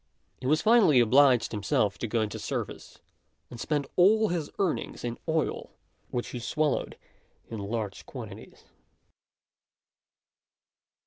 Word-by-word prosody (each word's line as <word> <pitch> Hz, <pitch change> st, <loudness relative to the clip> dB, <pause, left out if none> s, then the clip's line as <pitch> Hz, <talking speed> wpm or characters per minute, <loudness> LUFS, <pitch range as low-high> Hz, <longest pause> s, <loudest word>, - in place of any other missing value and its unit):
He 130 Hz, -, -4 dB
was 155 Hz, +3 st, +2 dB
finally 210 Hz, -, +5 dB
obliged 125 Hz, +1 st, +5 dB
himself 105 Hz, 0 st, 0 dB
to 115 Hz, -, -2 dB
go 115 Hz, +1 st, 0 dB
into 105 Hz, -2 st, -3 dB
service; -, -, -5 dB, 0.5 s
and 120 Hz, -, -9 dB
spent 145 Hz, +1 st, -1 dB
all 215 Hz, +4 st, +5 dB
his 170 Hz, -4 st, -2 dB
earnings 190 Hz, -5 st, -2 dB
in 120 Hz, -1 st, -4 dB
oil, 160 Hz, 0 st, -1 dB, 0.4 s
which 120 Hz, -, -3 dB
he 125 Hz, -, -5 dB
swallowed 150 Hz, +5 st, -1 dB, 0.5 s
in 110 Hz, -, -5 dB
large 105 Hz, 0 st, -4 dB
quantities. -, -, -10 dB
130 Hz, 120 wpm, -28 LUFS, 115-160 Hz, 0.5 s, finally